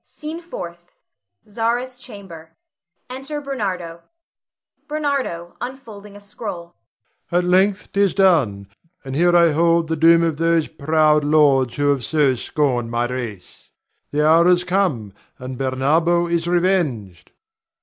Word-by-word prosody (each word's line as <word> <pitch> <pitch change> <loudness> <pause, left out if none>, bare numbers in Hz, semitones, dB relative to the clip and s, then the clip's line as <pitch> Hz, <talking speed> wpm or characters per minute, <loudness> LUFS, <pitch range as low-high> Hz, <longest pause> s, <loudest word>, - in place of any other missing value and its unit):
SCENE 315 +2 -8
FOURTH. 175 - -9 0.5
[Zara's 240 +4 -2
chamber. 190 -10 -12 0.5
Enter 270 +4 -6
Bernardo.] 190 -12 -4 0.9
Ber. 305 +1 -4 0.6
[unfolding 225 -6 -9
a - - -11
scroll]. 200 -4 -8 0.6
At 175 +1 +2
length 190 +3 +1
't 200 - -1
is 200 -2 +2
done, 140 - +2 0.4
and 135 0 -5
here 175 +3 +4
I 170 -1 +5
hold 165 +1 +2
the 160 - 0
doom 165 +2 +5
of 165 -3 -1
those 165 -1 +1
proud 155 0 +2
lords 145 -5 +3
who 145 0 +2
have 135 -3 -1
so 145 -1 +2
scorned 125 -2 -1
my 120 +1 -1
race. 120 -7 -7 0.4
The 150 +1 +1
hour 165 +2 +5
has 180 0 +3
come, 180 - -1 0.2
and 130 +1 -7
Bernardo 150 +7 +1
is 170 0 -1
revenged. 165 - -1
170 Hz, 130 wpm, -20 LUFS, 145-195 Hz, 0.9 s, I